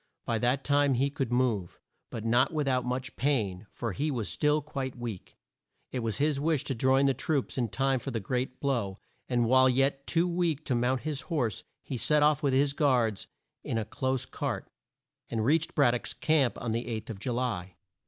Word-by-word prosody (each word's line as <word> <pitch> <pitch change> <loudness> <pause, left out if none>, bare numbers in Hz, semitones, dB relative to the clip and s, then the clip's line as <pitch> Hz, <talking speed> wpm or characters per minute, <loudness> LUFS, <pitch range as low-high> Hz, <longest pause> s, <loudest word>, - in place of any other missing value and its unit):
By 115 -1 0
that 125 +4 +1
time 145 -2 +3
he 135 +3 +1
could 135 -4 -2
move, 120 -8 0 0.3
but 115 -1 -6
not 120 +3 +3
with 150 -3 -1
out 130 -1 +2
much 125 +2 -3
pain, 110 -8 0
for 115 -2 -4
he 145 +10 -1
was 120 -7 -2
still 150 0 +2
quite 135 -4 -5
weak. 115 -6 -7 0.5
It 130 - -2
was 115 -2 -2
his 145 0 +1
wish 155 -1 +1
to - - -2
join 130 +3 +3
the 135 - +4
troops 140 +1 -1
in 120 -3 0
time 135 +3 +1
for - - -5
the 115 - -2
great 125 +5 -3
blow, 115 -9 -1 0.3
and 120 -2 +2
while 130 +2 +5
yet 135 +2 +1
too 170 +1 +2
weak 170 -4 0
to 130 - 0
mount 125 +2 +1
his 150 -2 -2
horse, 125 - -1 0.2
he 130 - -4
set 150 +5 +3
off 150 0 +3
with 140 -3 +1
his 140 +1 +3
guards 125 -8 +1 0.4
in - - -2
a 110 - -1
close 130 +2 -1
cart, 125 -9 -4 0.6
and 110 -2 -1
reached 160 +5 +2
Brad 130 -5 +5
dock's 125 - -3
camp 150 -6 +2
on 115 - -3
the 115 +2 -2
eighth 115 -1 -4
of 100 - -8
Ju 120 +4 -2
ly. 105 -8 -2
130 Hz, 205 wpm, -29 LUFS, 115-140 Hz, 0.6 s, while